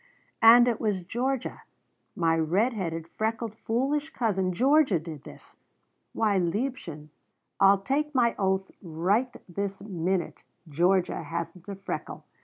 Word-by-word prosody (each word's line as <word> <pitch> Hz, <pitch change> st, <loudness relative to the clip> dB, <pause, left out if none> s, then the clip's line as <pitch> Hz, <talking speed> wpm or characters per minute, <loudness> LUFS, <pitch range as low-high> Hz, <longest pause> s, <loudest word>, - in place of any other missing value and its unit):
"And 235 Hz, +2 st, +8 dB
it 235 Hz, -2 st, 0 dB
was 205 Hz, -5 st, -1 dB
Georgia 250 Hz, +7 st, -3 dB, 0.5 s
my 165 Hz, -2 st, +2 dB
red 180 Hz, +10 st, +1 dB
headed, 165 Hz, -6 st, -4 dB
freckled, 220 Hz, +3 st, -3 dB
foolish 270 Hz, +7 st, -1 dB
cousin 200 Hz, -10 st, 0 dB
Georgia 270 Hz, -, +3 dB
did 155 Hz, -3 st, -8 dB
this! -, -, -14 dB, 0.5 s
Why, 210 Hz, -3 st, +1 dB
liebchen, 175 Hz, -, -3 dB, 0.5 s
I'll 195 Hz, 0 st, +5 dB
take 290 Hz, +6 st, -1 dB
my 235 Hz, -2 st, +3 dB
oath 190 Hz, -1 st, 0 dB
right 190 Hz, +9 st, 0 dB, 0.2 s
this 195 Hz, +2 st, -4 dB
minute 185 Hz, -2 st, -2 dB, 0.2 s
Georgia 175 Hz, +4 st, +1 dB
hasn't 170 Hz, +2 st, -6 dB
a 200 Hz, -, -4 dB
freckle! 195 Hz, -, -6 dB
195 Hz, 125 wpm, -27 LUFS, 175-235 Hz, 0.5 s, And